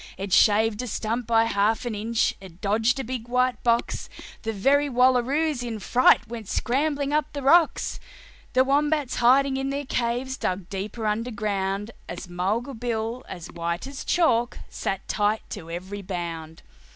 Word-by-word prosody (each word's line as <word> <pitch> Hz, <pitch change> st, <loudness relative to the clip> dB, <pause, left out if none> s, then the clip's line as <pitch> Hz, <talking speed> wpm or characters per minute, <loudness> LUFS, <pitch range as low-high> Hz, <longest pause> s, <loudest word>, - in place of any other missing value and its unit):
It 195 Hz, -1 st, -4 dB
shaved 220 Hz, +1 st, +4 dB
a 250 Hz, -, -5 dB
stump 230 Hz, +2 st, -2 dB
by 225 Hz, -1 st, +4 dB
half 225 Hz, +2 st, +1 dB
an 240 Hz, -, -2 dB
inch, 220 Hz, +2 st, 0 dB
it 185 Hz, -3 st, -13 dB
dodged 220 Hz, +6 st, +1 dB
a -, -, -2 dB
big 240 Hz, -1 st, -5 dB
white 250 Hz, +1 st, +1 dB
box: 235 Hz, -1 st, 0 dB, 0.3 s
The 225 Hz, -, -2 dB
very 280 Hz, +8 st, +2 dB
wallaroos 260 Hz, +3 st, +2 dB
in 235 Hz, -2 st, -4 dB
fright 240 Hz, +2 st, +4 dB
went 225 Hz, -2 st, -7 dB
scrambling 285 Hz, +2 st, 0 dB
up 300 Hz, -1 st, +1 dB
the 285 Hz, -1 st, -5 dB
rocks, 330 Hz, +4 st, +3 dB, 0.5 s
The 255 Hz, 0 st, +5 dB
wombats 290 Hz, 0 st, +1 dB
hiding 265 Hz, +3 st, +4 dB
in 270 Hz, 0 st, -2 dB
their 280 Hz, +1 st, -3 dB
caves 250 Hz, +2 st, -1 dB
dug 185 Hz, -1 st, -3 dB
deeper 205 Hz, +3 st, -4 dB
underground, 210 Hz, -2 st, -1 dB, 0.2 s
But 175 Hz, +1 st, -7 dB
Mulga 200 Hz, +9 st, -2 dB
Bill, 235 Hz, +1 st, -2 dB
as 175 Hz, -2 st, -8 dB
white 170 Hz, +3 st, -3 dB
as 275 Hz, 0 st, -7 dB
chalk, 245 Hz, -9 st, +2 dB, 0.2 s
clung 195 Hz, -, -2 dB
tight 210 Hz, +1 st, +1 dB
to 165 Hz, -, -7 dB
every 185 Hz, +4 st, -6 dB
bound. 170 Hz, -4 st, -6 dB
230 Hz, 160 wpm, -25 LUFS, 205-260 Hz, 0.5 s, The